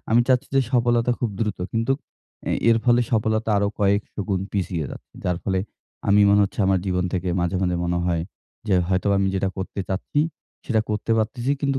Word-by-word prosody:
আমি 115 +2 +6
চাচ্ছি 130 +1 +2
যে - - +6
সফলতা 120 -1 +3
খুব 120 - 0
দ্রুত 105 -3 -1
কিন্তু 115 +3 +1 0.6
এ - - +1 0.2
এর 115 - +4
ফলে 120 0 +5
সফলতা 110 0 +1
আরো 100 0 +2
কয়েকশ 100 +1 +1 0.2
গুণ 95 -2 +1
পিছিয়ে 90 -5 -1
যাচ্ছে - - -11
যার 90 -1 +1
ফলে 95 -1 +1 0.5
আমি 100 +1 +6
মনে 100 +1 +5
হচ্ছে 100 - -7
আমার 95 0 +3
জীবন 90 -1 0
থেকে 90 0 -1
মাঝে, 90 +2 0
মাঝে 90 -1 +1
মনে 85 0 0
হয় 85 -2 0 0.4
যে 100 - +2
হয়তোবা 95 +2 +2
আমি 95 - +2
যেটা 95 0 +1
করতে 95 +1 -4
চাচ্ছি 100 +9 -1 0.4
সেটা 110 -4 +2
করতে 105 +2 -2
পারতেছি 120 +4 0
কিন্তু 140 -2 +1
100 Hz, 195 wpm, -23 LUFS, 95-115 Hz, 0.6 s, আমি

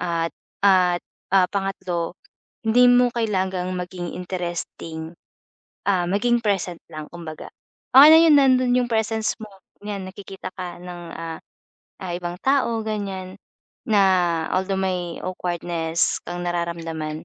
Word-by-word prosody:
At 165 -2 -1 0.3
at, 180 -3 +4 0.3
ah, 190 -1 +6
pangatlo 190 -4 -2 0.5
hindi 245 +3 +6
mo 245 0 +5
kailangang 190 -5 -1
maging 180 -1 -5
interesting, 175 -2 -5 0.8
ah, 185 -3 +2
maging 240 +6 +2
present 190 -4 0
lang 155 -1 -6
kumbaga. 165 -3 -8 0.4
Okey 275 +3 +11
na - - +9
'yun, 325 -2 +6
nandun 255 -2 +4
'yung 245 - +1
presence 220 -1 0
mo, 215 - -7 0.4
'yan 200 -2 -4
nakikita 195 0 -8
ka 180 -2 -6
ng, 175 -1 -8
ah 165 -1 -6 0.6
ah 180 -2 -4
ibang 175 0 -5
tao 265 -4 +2
ganiyan, 195 -3 -4 0.5
na 210 -2 +4 0.5
although 190 +1 0
may 180 -3 -2
awkwardness 170 -2 -1
kang 175 0 -4
nararamdaman, 165 -3 -3
185 Hz, 125 wpm, -23 LUFS, 175-210 Hz, 0.8 s, Okey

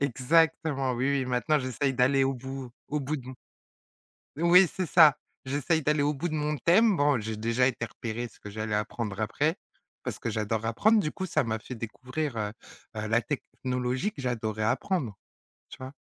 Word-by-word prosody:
Exactement, 140 +1 +2
oui, 135 +3 +1
oui, - - -1
maintenant 130 +5 +1
j'essaye 130 +1 -1
d'aller 135 +2 +3
au 135 0 0
bout 130 0 -7 0.2
au 150 - -1
bout 145 +2 -2
de 130 - -9
mon 130 - -7 1.0
Oui, 175 +3 +6
c'est 185 - -2
ça. 155 -3 +6 0.3
J'essaye 145 +4 0
d'aller 150 0 +2
au 150 - +2
bout 160 +5 -3
de 155 - -3
mon 150 0 -1
thème. 195 - +4
Bon, 145 -4 +3
j'ai 110 +1 -4
déjà 115 +3 +1
été 120 -3 -2
repérer 115 +1 -5
ce 115 - -21
que 105 - -9
j'allais 110 0 -2
apprendre 105 -1 -3
après, 145 +9 0 0.5
parce - - -4
que - - -3
j'adore 110 0 -2
apprendre. 215 - +3
Du 150 -6 -1
coup, 190 - -4
ça 175 - +1
m'a 115 -2 -2
fait 120 - -9
découvrir, 130 +4 -4
heu 105 -1 -2 0.4
heu, 105 0 -3
la 115 +2 +3
technologie 130 +3 -2
que 145 - -9
j'adorais 110 -4 -2
apprendre, 120 - -1 0.5
tu - - -10
vois? 130 +1 -8
130 Hz, 190 wpm, -28 LUFS, 115-150 Hz, 1.0 s, Oui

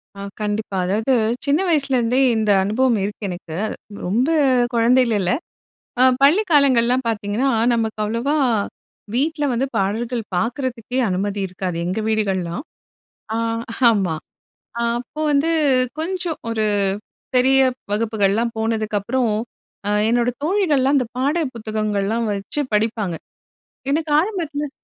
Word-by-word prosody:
ஆ, 200 - -11 0.2
கண்டிப்பா. 210 -1 -2
அதாவது 220 +7 +1 0.3
சின்ன 285 +2 +2
வயசுலேருந்தே 265 -5 +2 0.2
இந்த 215 -2 +2
அனுபவம் 230 +3 +2
இருக்கு 205 +1 -4
எனக்கு. 175 -2 -7 0.5
ரொம்ப 240 - +1 0.4
குழந்தைல 235 -1 +3
இல்ல. 180 - +1 0.7
அ - - +6 0.2
பள்ளி 300 +9 +6
காலங்கள்லாம் 260 -3 +4
பார்த்தீங்கன்னா, 220 +4 0 0.2
நமக்கு 225 -2 -1
அவ்ளோவா 230 +7 -1 0.8
வீட்ல 300 +3 0
வந்து 250 +3 0
பாடல்கள் 225 +5 -1
பார்க்கறதுக்கே 245 +3 -2
அனுமதி 200 +2 -1
இருக்காது 180 -1 -4
எங்க 185 +5 -2
வீடுகள்லலாம். 195 -1 -1 0.7
அ - - 0 0.5
ஆமா, 190 -7 0 0.7
அ - - 0 0.2
அப்போ 250 +5 -7
வந்து 290 +3 +2 0.5
கொஞ்சம் 350 -1 -2
ஒரு 225 -1 0 0.7
பெரிய 265 +2 +4 0.3
வகுப்புகள்லாம் 220 +1 +1
போனதுக்கப்பறம் 220 +1 0 0.5
அ - - +1 0.2
என்னோட 240 +1 +2
தோழிகள்லாம் 300 -7 +2
அந்த 255 - +1
பாடல் 285 +2 0
புத்தகங்கள்லாம் 215 0 -1
வச்சு 200 +9 -3
படிப்பாங்க. 210 -4 0 0.7
எனக்கு 305 +1 0
ஆரம்பத்தில 320 -6 -2
230 Hz, 110 wpm, -21 LUFS, 210-270 Hz, 0.8 s, அ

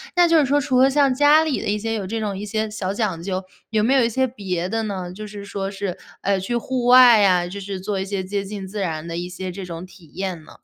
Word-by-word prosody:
那 350 -1 +5
就 330 -1 +5
是 285 - +3
说 285 +2 +2
除 260 -2 +2
了 265 - +6
像 275 -1 +3
家 295 +4 +5
里 310 -4 -1
的 - - -4
一 210 - +1
些 225 +2 -3
有 205 -4 -3
这 225 +3 -3
种 210 -2 -2
一 195 - -6
些 215 +1 -2
小 200 -3 -3
讲 205 -6 -2
究， 185 +1 -3 0.3
有 215 -2 +1
没 245 +5 +3
有 265 -3 +4
一 230 - +2
些 260 +3 +1
别 185 -8 -3
的 225 +3 -2
呢？ 185 -4 -4
就 210 +3 -8
是 205 -1 -9
说 195 -1 -4
是， 195 -2 -4 0.2
呃， 195 -1 +1
去 195 +6 -3
户 250 +1 -2
外 245 -4 +8
啊， 180 -2 +4
就 195 +3 -7
是 195 -1 -5
做 195 +1 -3
一 190 - -2
些 195 -1 -3
接 200 +1 -3
近 195 -1 -7
自 205 +2 -6
然 160 -3 -3
的 165 - -5
一 175 +1 -4
些 185 0 -6
这 195 +2 -7
种 170 -1 -7
体 185 -2 -17
验 185 -4 -4
呢？ - - -15
200 Hz, 305 characters per minute, -22 LUFS, 185-235 Hz, 0.3 s, 外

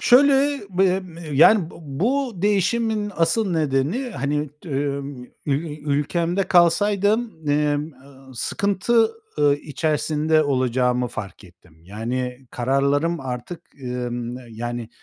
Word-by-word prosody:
Şöyle, 280 +2 +5
bem 185 -2 0
eee, 160 -3 -8
yani, 170 +3 +6
bu - - -13
bu 235 - -1
değişimin 210 +1 +1
asıl 175 +5 +2
nedeni, 155 - 0
hani, 145 - -2 0.2
ımm, 140 -3 -3 0.2
ül 150 +2 -2
ülkemde 165 +6 0
kalsaydım, 200 +1 +2
emm, 150 +1 +1
ııı, 135 0 -17
sıkıntı, 205 - +1 0.3
ııı, 145 -1 +4
içerisinde 155 +1 0
olacağımı 125 -3 +1
fark 105 -2 -8
ettim. 85 -2 -20
Yani, 125 +5 -4
kararlarım 140 +6 +1
artık, 130 +6 -6 0.2
ımm, 125 -1 -4
yani, 120 +1 -5
150 Hz, 110 wpm, -22 LUFS, 130-190 Hz, 0.3 s, yani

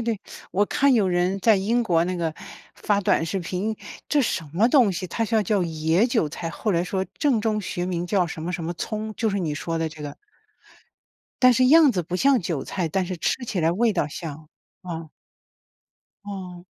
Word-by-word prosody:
对。 225 -3 -2 0.3
我 205 +2 +3
看 275 +5 +3
有 210 -5 +3
人 180 +2 +1
在 220 +3 +5
英 225 +6 +1
国 170 -7 +2
那 185 - -2
个 165 -2 -2 0.4
发 205 -1 0
短 185 - +2
视 195 +4 -2
频， 190 +5 -3 0.3
这 295 -2 +3
什 185 -7 -1
么 205 +6 +4
东 245 -7 +5
西？ 185 0 -4
它 225 - -3
叫 220 -1 +1
叫 200 0 +1
野 165 +5 +1
韭 230 -9 +1
菜， 165 +2 -5
后 205 +5 -2
来 170 -1 +2
说 190 +1 -2
正 275 -6 +2
宗 215 -1 0
学 175 -2 -3
名 175 -1 -2
叫 185 -2 +2
什 160 -1 -7
么 175 - -3
什 170 -2 -4
么 170 - -2
葱 215 +5 -4
就 225 0 0
是 200 - -1
你 160 -5 -2
说 165 +2 -3
的 165 0 0
这 155 -1 -11
个。 145 -1 -6 1.3
但 255 - +8
是 255 +1 +3
样 300 -1 +7
子 180 - -1
不 175 +2 -3
像 270 +4 +4
韭 165 -5 -3
菜， 180 -4 -2
但 190 +4 0
是 185 - -4
吃 245 +9 -1
起 205 -6 -2
来 160 0 +3
味 220 +5 +2
道 165 -5 0
像， 155 0 -8 0.3
嗯。 165 -3 -6 1.2
嗯。 185 -3 -7
185 Hz, 225 characters per minute, -24 LUFS, 170-220 Hz, 1.3 s, 但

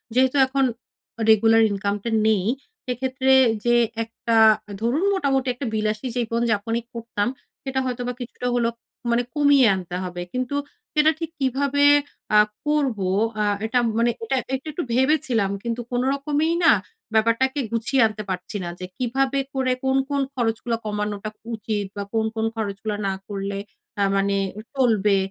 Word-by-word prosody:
যেহেতু 260 +2 +3
এখন 275 +1 +1 0.7
রেগুলার 225 +1 +6
ইনকামটা 200 +2 -2 0.2
নেই, 210 -4 +3 0.4
সেক্ষেত্রে 260 +1 +1 0.3
যে 240 0 +4 0.3
একটা 230 0 -3 0.5
ধরুন 260 +10 +1
মোটামুটি 270 -8 +1
একটা 255 +3 -6
বিলাসী 215 +2 -1
জীবন-যাপনই 230 -1 0
করতাম, 230 -2 -2 0.4
সেটা 265 -1 -2
হয়তো 250 -1 -3
বা 250 - -2
কিছুটা 245 0 -5
হলো 235 -1 +2 0.4
মানে 240 +1 +2
কমিয়ে 285 -4 +5
আনতে 180 -1 -6
হবে। 175 -1 -5
কিন্তু 255 +2 -2 0.4
সেটা 305 +1 +5
ঠিক 330 -1 -4
কিভাবে 280 +2 +1 0.5
অ্যা 210 0 +7 0.3
করবো 260 -11 +1 0.3
আ - - +3 0.2
এটা 245 +3 +2 0.2
মানে 235 +1 +3
এটা 265 +4 0 0.2
একটু, 270 +4 -7
একটু 340 +4 -3
ভেবেছিলাম 260 -6 +2
কিন্তু 235 0 -2
কোন 245 - +1
রকমেই 295 +4 0
না 325 - +8 0.4
ব্যাপারটাকে 230 +5 +2
গুছিয়ে 235 +3 +1
আনতে 215 -1 -6
পারছি 185 +2 -4
না 175 - -4
যে, 185 - -5
কিভাবে 265 +2 0
করে 260 -1 +1
কোন, 265 0 +2
কোন 280 -1 0
খরচগুলো 235 -2 -1
কমানোটা 210 0 -3 0.3
উচিত 210 -1 -3
বা 200 - -2
কোন, 220 -1 +1
কোন 220 - 0
খরচগুলা 205 -1 -3
না 195 - 0
করলে 200 -1 -4 0.4
আ - - +4
মানে 200 0 +1 0.4
চলবে। 210 -6 +3
235 Hz, 145 wpm, -23 LUFS, 215-265 Hz, 0.7 s, না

